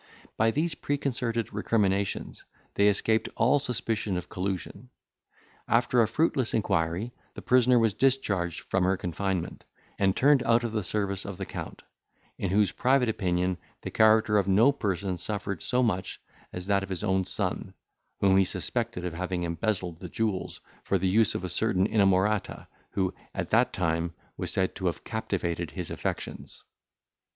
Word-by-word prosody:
By 115 Hz, +1 st, +3 dB
these 155 Hz, +7 st, 0 dB
preconcerted 125 Hz, -6 st, -2 dB
recriminations, 100 Hz, -2 st, 0 dB, 0.3 s
they 100 Hz, -, +4 dB
escaped 110 Hz, +2 st, +2 dB
all 125 Hz, +5 st, +4 dB
suspicion 110 Hz, -6 st, -2 dB
of 90 Hz, -, -6 dB
collusion. 95 Hz, +6 st, -4 dB, 0.8 s
After 120 Hz, +1 st, +3 dB
a 110 Hz, -, +3 dB
fruitless 130 Hz, 0 st, +1 dB
inquiry, 90 Hz, +1 st, 0 dB, 0.2 s
the -, -, -8 dB
prisoner 125 Hz, 0 st, +4 dB
was 115 Hz, -3 st, +3 dB
discharged 100 Hz, -11 st, +1 dB
from 95 Hz, -, 0 dB
her 95 Hz, +1 st, +2 dB
confinement, 90 Hz, 0 st, -3 dB, 0.4 s
and 95 Hz, -1 st, +3 dB
turned 140 Hz, 0 st, +5 dB
out 115 Hz, 0 st, +3 dB
of 120 Hz, -, -2 dB
the 110 Hz, -1 st, -1 dB
service 100 Hz, +1 st, -2 dB
of 100 Hz, -2 st, -6 dB
the 95 Hz, -, -4 dB
Count, -, -, -7 dB, 0.6 s
in 95 Hz, -, -1 dB
whose 100 Hz, 0 st, +3 dB
private 130 Hz, -1 st, +2 dB
opinion 90 Hz, -3 st, 0 dB, 0.2 s
the -, -, -5 dB
character 110 Hz, -1 st, +4 dB
of 100 Hz, -, -1 dB
no 110 Hz, +8 st, +5 dB
person 95 Hz, -8 st, -2 dB
suffered 100 Hz, +1 st, -4 dB
so 125 Hz, 0 st, +1 dB
much, 95 Hz, -5 st, -1 dB, 0.3 s
as 90 Hz, 0 st, -6 dB
that 100 Hz, 0 st, +2 dB
of 95 Hz, -, -6 dB
his 95 Hz, -3 st, -3 dB
own 95 Hz, 0 st, +2 dB
son, -, -, -3 dB, 0.5 s
whom 95 Hz, -1 st, +5 dB
he 95 Hz, -, +6 dB
suspected 115 Hz, 0 st, -3 dB
of 90 Hz, -, -3 dB
having 90 Hz, +1 st, -3 dB
embezzled 85 Hz, 0 st, -2 dB
the 90 Hz, -, -7 dB
jewels, 105 Hz, -1 st, -2 dB, 0.2 s
for 100 Hz, -, +1 dB
the 95 Hz, +1 st, 0 dB
use 105 Hz, +2 st, +3 dB
of -, -, -3 dB
a -, -, -2 dB
certain 95 Hz, +1 st, +1 dB
inamorata, 100 Hz, -1 st, +2 dB, 0.3 s
who, 95 Hz, -2 st, 0 dB, 0.2 s
at -, -, -3 dB
that -, -, +4 dB
time, 85 Hz, -1 st, -1 dB, 0.2 s
was -, -, -4 dB
said 95 Hz, 0 st, 0 dB
to 95 Hz, -, -3 dB
have 85 Hz, -, -3 dB
captivated 85 Hz, -7 st, -2 dB
his 90 Hz, +1 st, -6 dB
affections. -, -, -5 dB
100 Hz, 160 wpm, -28 LUFS, 90-115 Hz, 0.8 s, he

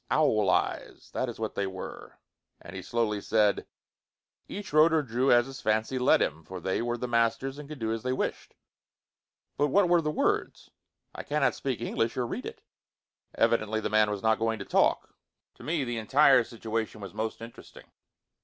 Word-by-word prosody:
Owl 110 Hz, -10 st, +3 dB
eyes! -, -, -1 dB
That 130 Hz, -, -1 dB
is 115 Hz, -, -8 dB
what 110 Hz, -1 st, -3 dB
they 100 Hz, -, -1 dB
were, 95 Hz, -1 st, -8 dB, 0.4 s
and 90 Hz, +2 st, -11 dB
he 95 Hz, -, -5 dB
slowly 105 Hz, +1 st, -1 dB
said, 105 Hz, -2 st, +1 dB, 0.8 s
"Each 205 Hz, -6 st, -7 dB
wrote 155 Hz, +2 st, +6 dB
or 160 Hz, -2 st, +2 dB
drew 125 Hz, +1 st, +1 dB
as 120 Hz, 0 st, +5 dB
his 135 Hz, 0 st, -9 dB
fancy 110 Hz, +4 st, 0 dB
led 125 Hz, -, +4 dB
him, 80 Hz, +3 st, -4 dB
for 95 Hz, +3 st, -8 dB
they 95 Hz, +4 st, -1 dB
were 120 Hz, 0 st, -2 dB
the 125 Hz, -, -4 dB
masters 115 Hz, +4 st, 0 dB
and 150 Hz, -1 st, -10 dB
could 155 Hz, -, -7 dB
do 110 Hz, -2 st, -2 dB
as 115 Hz, -, -4 dB
they 130 Hz, -, -2 dB
wished." 130 Hz, -, -3 dB, 1.0 s
"But 145 Hz, -, +2 dB
what 190 Hz, +5 st, +3 dB
were 175 Hz, -1 st, +4 dB
the 150 Hz, -, -1 dB
words?" 150 Hz, -, -1 dB, 0.4 s
"I -, -, -6 dB
cannot 150 Hz, -1 st, +1 dB
speak 130 Hz, -4 st, -3 dB
English, 115 Hz, 0 st, -1 dB
or 125 Hz, -, 0 dB
read -, -, -5 dB
it." -, -, -10 dB, 0.7 s
Evidently, 110 Hz, +1 st, +1 dB
the -, -, -3 dB
man 110 Hz, -1 st, +4 dB
was 105 Hz, -2 st, -4 dB
not 110 Hz, 0 st, +3 dB
going 115 Hz, 0 st, 0 dB
to 100 Hz, -, -7 dB
talk. -, -, +1 dB, 0.4 s
To -, -, -17 dB
me 160 Hz, -2 st, -1 dB
the 120 Hz, -2 st, -3 dB
entire 135 Hz, +2 st, +5 dB
situation 115 Hz, -1 st, -4 dB
was 100 Hz, -2 st, -8 dB
most 110 Hz, +1 st, -3 dB
interesting. 115 Hz, +1 st, -12 dB
115 Hz, 190 wpm, -28 LUFS, 110-135 Hz, 1.0 s, wrote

